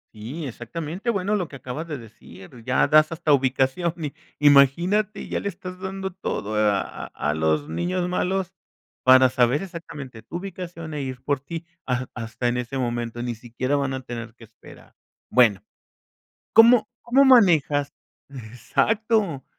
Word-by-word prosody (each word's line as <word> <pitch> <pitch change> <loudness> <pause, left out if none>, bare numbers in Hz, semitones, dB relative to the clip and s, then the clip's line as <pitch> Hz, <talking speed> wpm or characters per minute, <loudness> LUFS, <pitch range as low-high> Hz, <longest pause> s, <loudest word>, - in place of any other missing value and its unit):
Sí, 130 +9 -6
exactamente. 155 - -5
Bueno, 200 -1 0
lo 180 -5 -2
que 135 - -9
acabas 130 +6 -6
de 150 - -3
decir, 110 -1 -14
ya 125 0 +2
das 155 +1 +5
hasta 165 -2 +1
ubicación 135 +5 +1
y 150 -4 -5 0.3
imagínate, 170 +9 +4
ya - - -2
le 200 - -2
estás 185 0 -9
dando 190 0 -4
todo 110 - -4
a 105 -2 +2
a - - -8
a 75 +1 -2
los 80 -1 0
niños 175 - -2
malos 185 +1 -1 0.5
para 130 0 +7
saber 125 +2 +2
exactamente 150 -10 -8
tu 165 - -6
ubicación 175 -3 -7
e 150 - -3
ir 130 -2 -5
por 140 0 -1
ti 165 +4 -7 0.2
ha 125 0 -1
hasta 115 0 -4
en 120 - 0
ese 125 +2 -3
momento, 120 -2 -3
ni 120 -1 -3
siquiera 120 +4 -3
van 140 -1 -1
a 130 0 -5
tener 115 -2 -7
que 115 - -14
esperar. 110 - -17 0.3
Bueno, 115 -6 +4 0.9
¿cómo 230 +1 +6
cómo 265 +4 +4
manejas? 160 - +4 0.4
Exacto. 140 - -1
140 Hz, 155 wpm, -24 LUFS, 120-180 Hz, 0.9 s, para